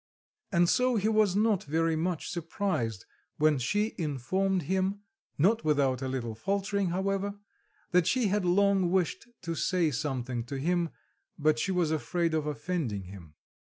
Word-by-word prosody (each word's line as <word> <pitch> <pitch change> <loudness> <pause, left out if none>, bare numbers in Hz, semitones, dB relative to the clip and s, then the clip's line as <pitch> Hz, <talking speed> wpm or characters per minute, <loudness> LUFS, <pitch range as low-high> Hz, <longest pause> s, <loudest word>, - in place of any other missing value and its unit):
And 175 -2 +4
so 250 +6 +3
he 215 0 +2
was 215 -4 +3
not 210 -2 +2
very 160 +2 +1
much 170 +1 -2
surprised 160 - -2 0.3
when 155 -2 +3
she 205 - 0
informed 175 +6 0
him, 190 +4 0 0.4
not 215 +9 +3
without 140 -4 +2
a 130 - -2
little 125 -4 -3
faltering, 200 - -1
however, 195 +3 -1 0.6
that 180 -2 +4
she 255 -3 +2
had 205 0 +1
long 190 0 +3
wished 185 +4 0 0.2
to 170 -1 -2
say 170 -1 +1
something 125 -2 -2
to 135 +3 -5
him, 170 +4 0 0.5
but 155 0 +2
she 190 - 0
was 175 -4 +1
afraid 165 +1 0
of 155 -1 0
offending 145 - -2
him. 90 -5 -12
170 Hz, 155 wpm, -29 LUFS, 145-195 Hz, 0.6 s, And